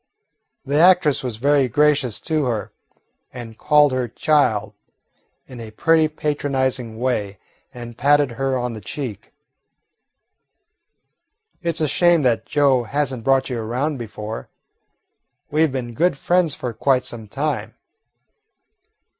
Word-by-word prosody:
The 140 +2 0
actress 170 -6 +4
was 120 -4 -4
very 140 +2 +2
gracious 145 -3 +2
to 155 -3 -1
her, 115 -4 -3 0.6
and 120 -3 -9
called 150 +3 +4
her 130 -1 -1
"child" 110 -6 +1 0.7
in 125 -2 -11
a 115 -1 -8
pretty, 160 +8 +2
patronising 135 -6 -2
way, 105 -6 -2 0.3
and 120 -1 -9
patted 145 -2 +3
her 130 +2 -1
on 125 -1 -3
the 110 - -8
cheek. 115 +1 -7 2.3
"It 170 -2 -2
's - - -1
a 155 - +2
shame 175 +1 +3
that 120 -3 +1
Joe 135 -4 +2
has 140 +2 -1
n't 120 -3 -7
brought 135 +1 +2
you 120 - -2
around 130 +6 -2
before. 110 -1 -7 1.0
We 155 +2 +3
've - - -8
been 125 -3 -5
good 165 +3 +1
friends 175 0 +1
for 125 -2 -5
quite 130 +3 +1
some 110 -2 -6
time." 135 -2 -3
130 Hz, 135 wpm, -21 LUFS, 120-150 Hz, 2.3 s, actress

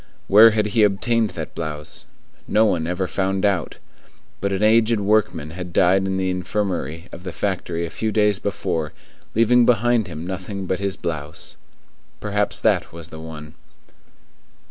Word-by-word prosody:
Where 110 +3 +8
had 110 -1 +1
he 115 - +3
obtained 110 +2 +2
that 80 - -5
blouse? 75 -2 -6 0.4
No 110 +1 +4
one 85 -6 0
ever 90 +2 -1
found 95 +1 -1
out. 95 -6 0 0.6
But 100 +1 -1
an 95 +1 -1
aged 110 +1 +4
workman 105 -6 +1
had 90 +1 -7
died 95 +2 +3
in 95 0 -1
the 95 -1 0
infirmary 90 -3 -3
of - - -9
the 90 - -5
factory 85 -3 -2
a 85 - -7
few 110 -1 -2
days 105 -2 +2
before, 85 -7 -3 0.4
leaving 120 +2 +5
behind 120 -2 +3
him 80 -1 -7
nothing 95 +1 -5
but 95 +1 -1
his 100 -1 -2
blouse. 75 -3 -6 0.6
Perhaps 105 0 -1
that - - +2
was 85 -1 -10
the 80 - -9
one. 80 -1 -9
95 Hz, 160 wpm, -22 LUFS, 85-105 Hz, 0.6 s, Where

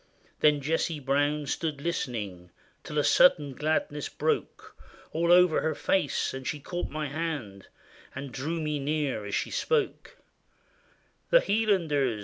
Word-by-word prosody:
There 150 - +6
Jessie 155 +2 -1
Brown 145 +2 0
stood 150 +1 -2
listening 110 - -4 0.3
Till 150 - -6
a 145 - +3
sudden 145 -5 +4
gladness 150 0 -1
broke - - -2 0.4
All 170 +2 +1
over 180 -2 +6
her 160 - -1
face; 180 -8 0
and 130 0 -6
she 150 - -2
caught 175 +5 -4
my 155 0 -3
hand 140 - -4 0.5
And 135 0 -6
drew 155 +7 -3
me 150 -2 -2
near 140 -6 -1
as - - -2
she - - -2
spoke: 465 -2 -1 0.3
— - - -37
" - - -38
The - - +7
Hielanders 165 - +1
150 Hz, 145 wpm, -28 LUFS, 135-165 Hz, 0.5 s, The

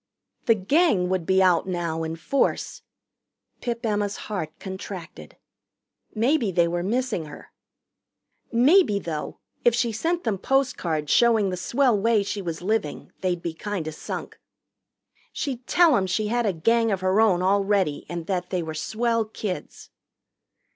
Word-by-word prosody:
The 230 - +6
Gang 205 - +2
would 185 -3 -1
be 190 0 +4
out 180 0 +3
now 170 -3 -2
in 160 0 -3
force. 215 +12 -1 0.8
Pip 235 0 -3
Emma's 205 -2 0
heart 190 -7 -4
contracted. 190 -2 -8 0.8
Maybe 235 -1 +2
they 170 -1 +3
were 175 +1 -1
missing 220 -2 -1
her. 150 - -12 1.0
Maybe, 260 - +5
though, 160 -6 -5 0.3
if 240 -1 +4
she 235 -1 +1
sent 335 +11 -1
them 215 -5 -1
post 270 +3 +1
cards 155 -3 -2
showing 225 -5 +4
the - - -2
swell 245 +6 +2
way 215 +1 +2
she 200 0 -4
was 170 -2 -5
living, 210 -6 -2
they'd 180 -2 -1
be 170 - -3
kinda 170 -2 -4
sunk. 155 - -7 0.9
She'd 255 -4 -4
tell 340 -5 +5
'em 190 -4 +1
she 210 +3 -1
had 240 0 +1
a - - +3
Gang 230 +7 +2
of 190 -2 -1
her 190 +3 +3
own 185 -5 +3
already 195 -4 +1
and 170 -1 -5
that 180 -1 -2
they 180 -2 -1
were 160 -1 -5
swell 230 +8 0
kids. 210 -3 -6
200 Hz, 155 wpm, -24 LUFS, 175-230 Hz, 1.0 s, The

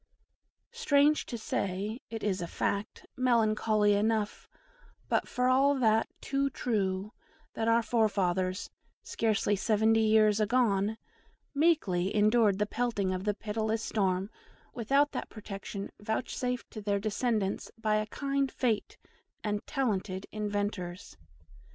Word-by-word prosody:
Strange 300 -10 +3
to 235 - -4
say, 205 +1 -2
it 225 -1 -6
is 195 -3 0
a 170 - -3
fact, 200 +4 -3
melancholy 215 -4 +3
enough, 210 0 0 0.6
but - - +1
for 250 0 0
all 270 +2 +4
that 225 -4 +3
too 275 0 0
true, 205 -5 -2 0.4
that 225 - -2
our 230 0 +4
forefathers, 190 -5 0 0.3
scarce 220 -3 0
seventy 220 0 +3
years 215 -1 +4
agone, 215 -2 +2 0.6
meekly 255 - +2
endured 215 -1 +4
the 210 - +1
pelting 210 -4 -1
of 185 +1 -4
the 210 -1 +1
pitiless 220 +1 -2
storm 195 -1 0 0.4
without 275 +5 +2
that - - -5
protection 200 -1 -7
vouchsafed 245 +3 -3
to 215 - -7
their 205 -1 0
descendants 215 -1 -1
by 215 -1 +1
a 215 0 -1
kind 275 +3 -1
fate 230 -5 -1 0.5
and 210 -1 -2
talented 200 -8 -1
inventors. 205 - -3
215 Hz, 120 wpm, -30 LUFS, 200-240 Hz, 0.6 s, all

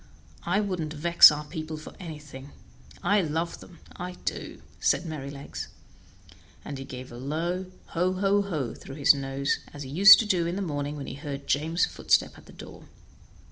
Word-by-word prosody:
I 190 +4 +2
wouldn't 180 -7 -3
vex 170 +2 +8
our 150 0 -4
people 155 0 -6
for 155 - -10
anything; 150 -5 -10 0.5
I 200 +3 +3
love 165 +1 -3
them, 175 - -14 0.2
I 180 +1 -6
do," - - -5 0.2
said - - +1
Merrylegs, 140 -3 -6 1.0
and 140 - -6
he 135 - -7
gave 130 -1 -9
a 120 - -9
low 165 +8 -3 0.2
"ho, 180 +2 0
ho, 195 +2 +2
ho!" 155 -11 -3
through 135 - -11
his 140 -1 +6
nose, 135 0 -2 0.2
as 145 - -6
he 130 - -9
used 195 +6 +10
to 225 - 0
do 180 -5 +1
in 170 - -2
the 200 - -2
morning 145 -3 -3
when 140 -2 -6
he - - -6
heard 140 0 -7
James' 160 +4 +1
footstep - - +1
at - - -17
the - - -13
door. - - -12
155 Hz, 180 wpm, -27 LUFS, 140-180 Hz, 1.0 s, used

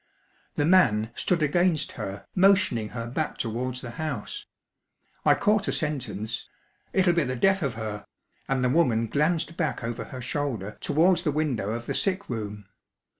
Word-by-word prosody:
The 145 - +1
man 120 - +4
stood 170 +4 0
against 175 +1 +2
her, 95 +1 -6
motioning 190 - +3
her 115 -1 -5
back 140 +6 -3
towards 125 +2 -2
the 120 - -6
house. 140 -9 -4 0.8
I - - +5
caught 210 0 +2
a - - +1
sentence 125 - -2 0.4
"It'll 185 -2 +3
be 170 -1 +2
the 130 -1 -2
death 195 +9 +3
of 135 -6 -1
her;" 110 -2 -5 0.4
and 135 -1 +1
the 125 - +3
woman 125 -6 +3
glanced 160 +6 0
back 160 -7 -1
over 115 0 -3
her 130 - -8
shoulder 125 -5 -3
towards 170 +3 +3
the 160 -4 0
window 140 -9 -1
of 120 +1 -4
the - - -2
sick 195 0 0
room. 105 -3 -5
135 Hz, 165 wpm, -26 LUFS, 115-170 Hz, 0.8 s, I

